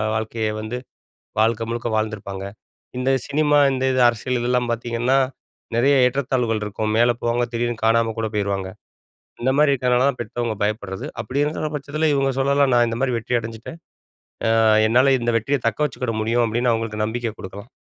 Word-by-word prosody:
வாழ்க்கைய 110 0 -2
வந்து 110 +3 -4 0.6
வாழ்க்க 115 +1 +2
முழுக்க 120 +1 -3
வாழ்ந்திருப்பாங்க. 105 -3 -3 0.5
இந்த 130 +1 0 0.2
சினிமா 150 0 +2
இந்த 130 0 -2
இது 130 - +1
அரசியல் 120 +2 -1
இதெல்லாம் 125 0 0
பார்த்தீங்கன்னா, 120 +2 0 0.6
நெறைய 135 +4 +4
ஏற்றத்தாழ்வுகள் 125 -4 0
இருக்கும். 105 +1 -3
மேல 120 +1 +4
போவாங்க 120 +1 +1
திடீர்னு 120 -1 -2
காணாம 115 0 +3
கூட 110 - 0
போயிருவாங்க. 100 -2 -1 0.7
இந்த 130 +2 +2
மாரி 150 -1 +5
இருக்குறனால 125 -1 +2
தான் 130 - -4
பெத்தவங்க 120 0 -3
பயப்படுறது. 105 -2 -3 0.2
அப்படி 130 +6 -2
இருக்குற 155 +1 -2
பட்சத்தில 150 +2 -1
இவங்க 135 -1 +1
சொல்லலாம்,"நான் 135 -3 +3
இந்த 115 0 -3
மாரி 130 -2 +1
வெற்றி 120 +2 -1
அடைஞ்சிட்டேன். 115 +8 -8 0.8
ஆ - - +4 0.3
என்னால 125 +4 +4
இந்த 120 0 0
வெற்றிய 140 +6 -1
தக்க 110 - -5
வச்சுக்கிட 125 -5 -4
முடியும் 115 +2 +1
அப்படின்னு 120 +2 +1
அவங்களுக்கு 115 -2 -2
நம்பிக்கை 115 +1 -3
குடுக்கலாம்." 100 +5 -9
120 Hz, 160 wpm, -22 LUFS, 110-130 Hz, 0.8 s, மாரி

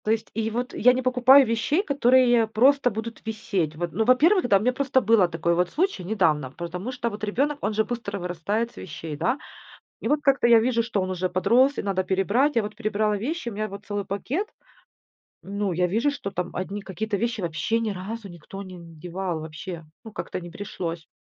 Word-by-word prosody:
То 215 - +2
есть, 225 0 -1
и 225 0 -1
вот 245 +3 -3
я 250 +2 +5
не 255 - -1
покупаю 255 +2 +6
вещей, 230 - +1
которые 250 - +4
просто 255 +5 +4
будут 225 +1 -6
висеть. 200 -8 -2
Вот, 170 +1 -3
ну, 220 - +1
во-первых, 300 - +4
да, 200 - +5
у - - -1
меня 250 +5 +1
просто 265 0 +2
был 220 -5 +4
такой 170 0 0
вот 175 +1 +1
случай 340 - -1
недавно, 165 -9 +1
потому 180 +7 -5
что 245 -2 -2
вот 210 -1 -9
ребёнок, 280 +8 0
он 210 - -1
же 220 +1 +2
быстро 230 -4 -4
вырастает 185 +6 -2
с - - -25
вещей, 160 -2 -7
да. 225 - 0 0.7
И - - 0
вот 295 0 +2
как-то 275 -3 +3
я 235 -1 +7
вижу, 235 0 +1
что 225 -3 -1
он 185 - -3
уже 185 0 -1
подрос 245 +10 +3
и - - -1
надо 195 -2 -1
перебрать. 200 +10 +1
Я 230 - +4
вот 210 0 -6
перебрала 215 -1 0
вещи, 285 - -3
у - - -8
меня 215 +1 -2
вот 200 +1 -9
целый 205 -1 -2
пакет. 240 - -2 1.0
Ну, 200 -1 -2
я 180 +1 +1
вижу, 225 +10 +1
что 280 -8 -5
там 180 -1 -3
одни 195 +3 -4
какие-то 200 +2 -3
вещи 230 0 -2
вообще 170 +6 -1
ни 225 -2 -1
разу 205 +4 -6
никто 175 +3 -10
не 185 -2 -10
надевал, 170 +1 -5
вообще, 160 +2 -7 0.2
ну, 220 - -8
как-то 200 - -5
не 175 -1 -9
пришлось. 170 -4 -5
215 Hz, 210 wpm, -25 LUFS, 185-240 Hz, 1.0 s, я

